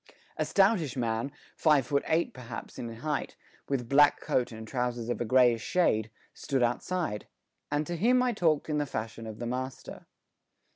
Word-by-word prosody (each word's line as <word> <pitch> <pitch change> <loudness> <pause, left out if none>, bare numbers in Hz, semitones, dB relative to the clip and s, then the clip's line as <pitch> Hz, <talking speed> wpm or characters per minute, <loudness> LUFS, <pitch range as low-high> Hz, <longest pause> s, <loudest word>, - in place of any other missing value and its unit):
A - - -1
stoutish 190 - +2
man, 115 +2 -1 0.2
five 150 -5 +4
foot 140 +2 +1
eight 165 +2 +1
perhaps 125 -2 -8
in 120 -1 -5
height, 140 +6 -3 0.3
with 130 -4 -1
black 145 +3 +5
coat 125 0 0
and 110 0 -8
trousers 120 -1 -2
of 120 - -2
a - - 0
greyish 120 -1 +4
shade, 110 - +1 0.2
stood 135 -3 -1
outside, 120 0 -1 0.4
and 145 +1 0
to 175 - -3
him 250 +8 +3
I 250 -1 +1
talked 160 -7 +1
in 150 -1 0
the 145 - -1
fashion 110 -1 -5
of 110 -1 -7
the 120 - -5
master. 130 +2 -5
130 Hz, 175 wpm, -29 LUFS, 115-155 Hz, 0.4 s, black